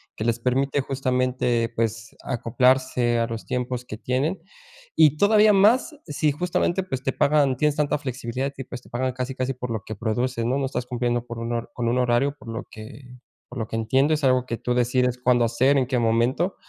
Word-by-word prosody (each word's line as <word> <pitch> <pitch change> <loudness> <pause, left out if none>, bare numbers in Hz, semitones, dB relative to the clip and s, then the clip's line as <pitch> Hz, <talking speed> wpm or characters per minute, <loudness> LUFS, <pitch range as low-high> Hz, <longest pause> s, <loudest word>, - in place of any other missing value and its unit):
que 110 - -4
les 115 0 +1
permite 135 +3 0
justamente, 125 -3 0
pues, 115 0 -2
acoplarse 125 -1 +1
a 115 - +1
los 115 -1 -6
tiempos 125 -1 -3
que 105 - -7
tienen, 135 - -1 0.5
y 155 -2 +5
todavía 210 +2 +5
más, 230 +10 +4
sí 150 0 0
justamente, 175 +3 0
pues, 130 -8 -5
te 135 - -1
pagan 145 -2 +3
tienes 150 +2 +1
tanta 150 -1 +1
flexibilidad, 130 -1 -4
y 135 - -5
pues, 125 -1 -8
te - - -19
pagan 130 +1 -2
casi 130 +1 -4
casi 130 +1 -2
por 125 0 -6
lo 110 -2 -3
que 110 - -6
produces, 115 +3 -1
¿no?, 125 +3 +1
no 140 - -1
estás 125 -2 -4
cumpliendo 120 -1 -1
con 120 - -7
un 115 +1 -4
hor 115 0 -3
con 120 -1 -2
un 125 +2 +1
horario, 125 +3 +1
por 115 - -12
lo 115 - -5
que 125 +4 -11 0.3
por 125 - -7
lo 110 - -3
que - - -5
entiendo, 130 +7 +2
es 150 - -5
algo 130 -1 +3
que 115 - -3
tú 125 - -2
decides 125 0 +1
cuándo 120 -1 +4
hacer 130 +5 +2
en 130 - +2
qué 130 -2 0
momento. 120 - +1
125 Hz, 210 wpm, -24 LUFS, 120-140 Hz, 0.5 s, y